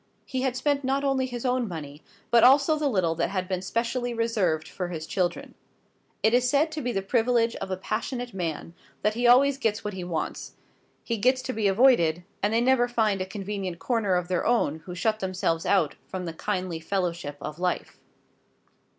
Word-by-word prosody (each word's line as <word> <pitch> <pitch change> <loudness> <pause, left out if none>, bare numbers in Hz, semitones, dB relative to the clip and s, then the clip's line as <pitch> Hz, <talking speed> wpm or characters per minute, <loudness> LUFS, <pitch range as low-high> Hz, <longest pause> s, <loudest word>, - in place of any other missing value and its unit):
He 260 - -3
had 260 -2 0
spent 285 0 0
not 270 +2 0
only 270 -2 +1
his 245 0 -6
own 250 -1 +1
money, 150 -4 -7 0.3
but 235 -1 +6
also 280 +5 +6
the 300 -1 0
little 185 -8 +1
that 170 +1 -1
had 185 -2 -2
been 185 -1 -2
specially 235 +4 -2
reserved 205 -9 0
for 180 - -4
his 160 -3 -5
children. 180 0 -2 0.7
It 220 - +4
is 250 0 +3
said 295 +3 +2
to 310 -1 -4
be 245 -2 -1
the 195 -4 -2
privilege 230 +2 +2
of - - -5
a 185 - -2
passionate 245 +5 -4
man 170 -2 -4 0.3
that 210 - +2
he 240 +2 +1
always 270 +3 +5
gets 225 -4 0
what 210 - -4
he 185 -1 -5
wants; 175 -2 -4 0.5
he 230 - -2
gets 255 +4 +2
to 255 - -3
be 215 -2 +1
avoided, 190 -6 +4 0.2
and 205 - +1
they 230 +1 +2
never 245 -1 +3
find 220 -5 +1
a 185 - -3
convenient 195 -2 -4
corner 210 -1 0
of 180 -1 -1
their 180 -1 0
own 225 -10 +1
who 180 - -6
shut 215 +3 0
themselves 185 -4 -1
out 185 -7 +3
from 185 -1 -5
the 165 - -4
kindly 185 -2 -3
fellowship 170 -4 -2
of 150 +2 -7
life. 180 0 -2
210 Hz, 200 wpm, -26 LUFS, 180-245 Hz, 0.7 s, but